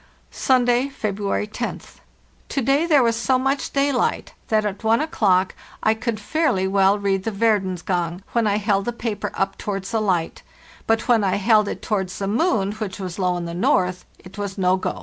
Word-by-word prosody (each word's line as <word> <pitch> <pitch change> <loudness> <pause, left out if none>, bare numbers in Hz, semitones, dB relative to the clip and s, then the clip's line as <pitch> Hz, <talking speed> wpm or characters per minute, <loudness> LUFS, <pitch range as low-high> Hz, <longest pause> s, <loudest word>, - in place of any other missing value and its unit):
«Sunday, 245 0 +2
Vebruary 210 -5 -2 0.2
moth, - - -5 0.5
To 275 - -1
day 280 +6 +2
there 295 -6 +5
was 230 -1 +2
so 255 +3 +1
much 270 +2 -1
daylight 275 -2 0
that 215 -1 +1
at 205 +1 -4
1 225 +1 +3
o'clock 195 - +1 0.3
I 220 - +4
could 220 -1 -3
fairly 230 - 0
well 195 +1 +3
read 195 -2 0
the 225 - -1
Verdens 195 -4 0
Gang, 175 0 -2
when 235 -2 +1
I 205 0 +2
held 200 -2 0
the 240 - -2
paper 220 -4 -3
up 195 0 -2
towards 195 -2 -4
the 225 - 0
light; 180 -6 -1 0.5
but 225 0 +1
when 230 -3 +4
I 190 - +1
held 210 +1 +3
it - - -5
towards 190 -4 -2
the 195 - -3
moon, 215 - +1
which 210 -2 -5
was 185 -1 -6
low 180 -1 +1
in 175 - -4
the 170 - -5
north, 180 +1 +1
it 190 +3 -13
was 200 -1 -4
no 185 -1 +3
go. 185 - -3
205 Hz, 195 wpm, -22 LUFS, 190-235 Hz, 0.5 s, there